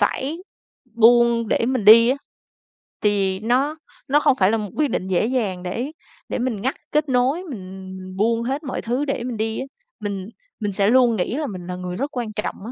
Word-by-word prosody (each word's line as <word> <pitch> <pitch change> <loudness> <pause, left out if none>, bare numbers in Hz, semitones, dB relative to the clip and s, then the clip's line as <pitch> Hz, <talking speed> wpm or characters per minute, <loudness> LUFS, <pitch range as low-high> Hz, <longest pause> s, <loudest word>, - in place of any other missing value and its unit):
phải 265 +9 0 0.6
buông 235 -1 +5
để 230 - +1
mình 255 -5 0
đi 230 +2 +9
á. 260 - +2 0.9
Tại 210 - +3
vì 195 -2 0
nó 255 +7 +1 0.3
nó 290 +2 +4
không 275 - +3
phải 195 -3 +3
là 225 - +2
một 210 -2 -4
quyết 300 -1 +2
định 185 - -2
dễ 190 +2 +1
dàng 215 -8 -1
để 235 +10 -3 0.4
để - - -2
mình 240 -5 -2
ngắt 265 +5 -1 0.2
kết 300 -1 +1
nối, 260 +8 +2
mình 190 - -8
mình 185 0 -9
buông 230 +2 +1
hết 275 +5 -2
mọi 260 - -4
thứ 245 +5 -1
để 270 -4 -2
mình 245 -3 -4
đi 220 +1 -2
á, 265 - -3 0.3
mình 200 -3 -4 0.3
mình 205 -2 -2
sẽ 200 0 +2
luôn 245 -1 +5
nghĩ 215 +7 -1
là 305 - -2
mình 185 -5 -7
là 180 - -4
người 180 0 -5
rất 280 +3 -4
quan 225 -3 -3
trọng 210 - -3
á, 235 - -6
230 Hz, 220 wpm, -22 LUFS, 200-260 Hz, 0.9 s, đi